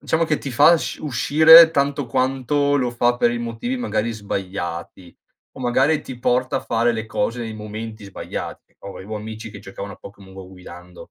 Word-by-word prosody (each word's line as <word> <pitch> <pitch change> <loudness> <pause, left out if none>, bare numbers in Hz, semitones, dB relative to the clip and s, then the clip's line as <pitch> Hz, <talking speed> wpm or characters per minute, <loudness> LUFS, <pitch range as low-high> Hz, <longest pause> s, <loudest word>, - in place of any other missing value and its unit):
diciamo 165 +1 0
che 155 -2 -1
ti 135 - -7
fa 150 +7 +6
sc - - -5
uscire 160 +4 +7
tanto 140 -1 0
quanto 135 +4 0
lo 125 -3 0
fa 120 0 +1
per 120 -1 +2
i 120 - -3
motivi, 120 - -4
magari, 115 - -2
sbagliati, 90 -4 -6 0.4
o - - -9
magari 135 +5 +2
ti 130 - -9
porta 125 +1 0
a - - -2
fare 115 +1 0
le 110 -1 -5
cose 115 +2 -2
nei 110 -2 -5
momenti 110 0 -8
sbagliati. 100 - -8
Avevo 100 +2 -8
amici 110 +1 -8
che 100 - -10
giocavano 100 0 -9
a - - -20
Pokèmon 100 -1 -14
Go 95 -1 -10
guidando. 90 -1 -13
115 Hz, 185 wpm, -21 LUFS, 100-135 Hz, 0.4 s, uscire